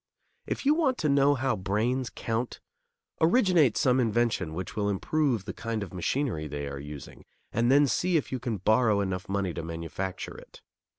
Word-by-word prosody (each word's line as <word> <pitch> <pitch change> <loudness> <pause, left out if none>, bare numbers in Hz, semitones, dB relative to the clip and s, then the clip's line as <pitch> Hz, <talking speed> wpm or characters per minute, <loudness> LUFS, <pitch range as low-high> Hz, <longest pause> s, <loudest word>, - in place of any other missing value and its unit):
If - - -3
you 290 - +6
want 295 -6 +1
to 155 - 0
know 140 +1 +4
how 130 0 0
brains 115 +7 -1
count, 115 +2 -3 0.6
originate 170 - +4
some 130 0 +3
invention 115 -8 0
which 95 +1 -5
will 105 -1 0
improve 120 +2 0
the 95 - -5
kind 115 -2 -3
of 95 - -9
machinery 90 - -1
they 70 -1 -4
are 70 0 -5
using, 75 0 -9 0.3
and 120 +2 +2
then 145 +2 +6
see 175 +5 +1
if 150 - -3
you 130 - -2
can 115 -3 -2
borrow 110 +2 +3
enough 95 -1 -3
money 95 -3 -1
to 85 - -4
manufacture 85 +3 -5
it. - - -14
115 Hz, 180 wpm, -28 LUFS, 95-135 Hz, 0.6 s, you